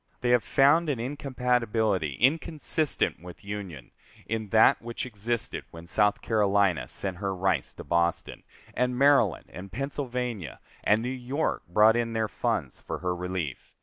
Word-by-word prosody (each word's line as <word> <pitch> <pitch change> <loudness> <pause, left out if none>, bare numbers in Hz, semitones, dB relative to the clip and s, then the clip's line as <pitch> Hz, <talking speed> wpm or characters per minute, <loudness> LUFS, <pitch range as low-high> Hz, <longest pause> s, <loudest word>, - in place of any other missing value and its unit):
They 120 - +1
have 125 -2 +4
found 155 +4 +4
an 135 -5 -1
incompatibility 120 - 0
inconsistent 155 - 0
with 90 +2 -11
union, 95 -10 -7 0.3
in 110 -1 -3
that 110 +2 +5
which 120 +1 -5
existed 115 0 -3
when 85 0 -11
South 105 +3 +1
Carolina 100 -5 +2
sent 95 -3 -2
her 95 0 -2
rice 95 +1 0
to - - -8
Boston, 85 +2 0 0.3
and 125 0 0
Maryland 135 - +4
and 95 +2 -9
Pennsylvania 125 - -4 0.2
and 110 +2 +3
New 125 - -2
York 130 +4 -2
brought 105 +6 +5
in 115 -1 -1
their 110 -1 0
funds - - -2
for - - -5
her 90 -1 -2
relief. 90 -6 -4
110 Hz, 150 wpm, -27 LUFS, 95-125 Hz, 0.3 s, that